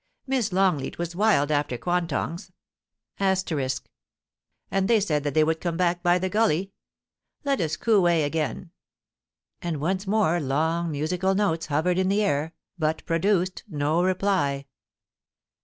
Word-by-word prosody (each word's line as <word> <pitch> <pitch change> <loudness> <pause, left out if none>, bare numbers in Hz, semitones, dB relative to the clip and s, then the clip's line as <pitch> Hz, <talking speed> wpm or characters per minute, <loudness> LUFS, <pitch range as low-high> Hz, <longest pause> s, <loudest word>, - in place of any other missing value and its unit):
Miss 255 -6 0
Longleat 180 -7 +1
was 175 0 -4
wild 190 -8 +3
after 145 -4 0
quantongs,* 170 +1 -2 0.7
and 185 - -3
they 230 -2 +4
said 150 -8 0
that 145 -2 -2
they 155 - +5
would 160 +1 0
come 170 -2 -2
back 175 -1 +1
by 175 0 +3
the 185 +1 -1
gully. 195 -2 +1 0.7
Let 280 -6 0
us 155 -2 -1
coo 205 -4 +3
ee 165 -2 +3
again.' 160 +3 -2 0.9
And 170 -4 -3
once 190 +6 -1
more 195 -5 +2
long 160 +4 0
musical 175 +6 0
notes 170 -5 0
hovered 160 +5 +1
in 190 0 +1
the 205 +2 +2
air, 160 -3 -1 0.2
but 155 0 -1
produced 185 +2 0
no 150 +3 0
reply. 185 -7 0
175 Hz, 140 wpm, -25 LUFS, 155-190 Hz, 0.9 s, they